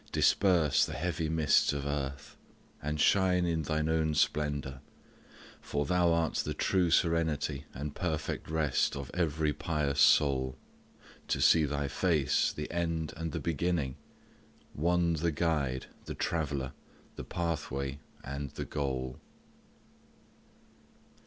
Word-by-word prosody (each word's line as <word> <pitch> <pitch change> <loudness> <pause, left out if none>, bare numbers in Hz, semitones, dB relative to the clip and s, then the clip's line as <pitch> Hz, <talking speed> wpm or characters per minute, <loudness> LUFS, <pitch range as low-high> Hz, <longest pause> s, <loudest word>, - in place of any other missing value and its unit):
Disperse 90 -7 +3
the - - -2
heavy 80 0 -2
mists 80 -3 +3
of 70 -1 -3
earth, 70 -1 -4 0.5
And 75 +1 -3
shine 90 0 +3
in 80 -2 0
Thine 80 +1 -1
own 80 -1 +1
splendour. 70 -3 0 0.8
For 70 0 -2
Thou 90 0 +3
art 85 -1 +1
The - - -2
true 90 -3 +2
serenity 80 -4 +1
and 70 +3 -5
perfect 80 -4 -3
rest 80 -4 +1
Of 70 -1 -6
every 80 -3 0
pious 75 -3 -1
soul 65 -2 +4 0.7
to - - 0
see 80 -2 +5
Thy 70 0 -2
face, 75 0 +2
The 75 - -6
end 85 -2 -2
and 80 -1 -4
the - - -3
beginning 80 -4 -1 0.8
One 85 +2 +2
the 85 +1 0
guide, 70 -5 0 0.2
The - - -5
traveller, 70 -5 -2 0.4
the - - -6
pathway, 70 -5 -3 0.2
and 70 +1 -5
the - - -6
goal. 65 -3 -3
75 Hz, 125 wpm, -31 LUFS, 70-85 Hz, 0.8 s, see